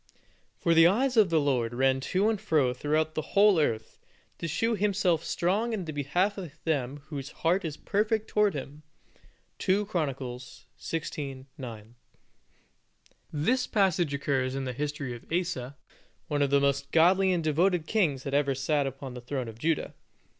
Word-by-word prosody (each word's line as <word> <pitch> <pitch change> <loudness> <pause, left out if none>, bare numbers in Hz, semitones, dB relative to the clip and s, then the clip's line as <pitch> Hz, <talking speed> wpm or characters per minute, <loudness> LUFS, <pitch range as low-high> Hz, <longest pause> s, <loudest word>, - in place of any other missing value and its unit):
For 170 - +2
the 165 0 +7
eyes 250 +8 +2
of 215 -5 +5
the 165 -1 +3
Lord 125 -5 0
ran 135 +1 +2
to 185 +9 +1
and 220 -2 0
fro 150 -11 +2
throughout 155 +4 0
the 155 - -1 0.2
whole 200 -3 +6
earth, 110 -7 -1 0.4
to 170 - -3
shew 225 +9 0
Himself 195 -5 +1
strong 205 +7 0
in 195 -5 -3
the 155 - -4
behalf 175 +9 0
of 175 -6 -7
them 140 -3 -2
whose 140 -3 -5
heart 180 +4 0
is 155 -3 -4
perfect 215 +1 0
toward 210 -3 +2
Him 145 +2 -7 0.8
2 200 +2 +2
CHRON. 170 -8 -1 0.7
xvi. 140 -4 -5
9. 115 -3 -9 1.4
This 245 - +1
passage 180 -7 +1
occurs 135 -2 -1
in 135 0 -3
the 125 - -3
history 145 -1 -3
of 120 - -14
Asa, 165 -7 -2 0.5
one 145 -3 -1
of 140 - +2
the 140 +1 +4
most 140 0 0
godly 185 +4 +4
and 175 -2 0
devoted 165 +2 +2
kings 160 -12 +1
that 140 - -4
ever 140 -1 +2
sat 140 +1 0
upon 135 -1 -7
the 125 - -8
throne 125 0 -4
of 110 0 -10
Judah. 160 +3 -1
155 Hz, 170 wpm, -28 LUFS, 135-185 Hz, 1.4 s, the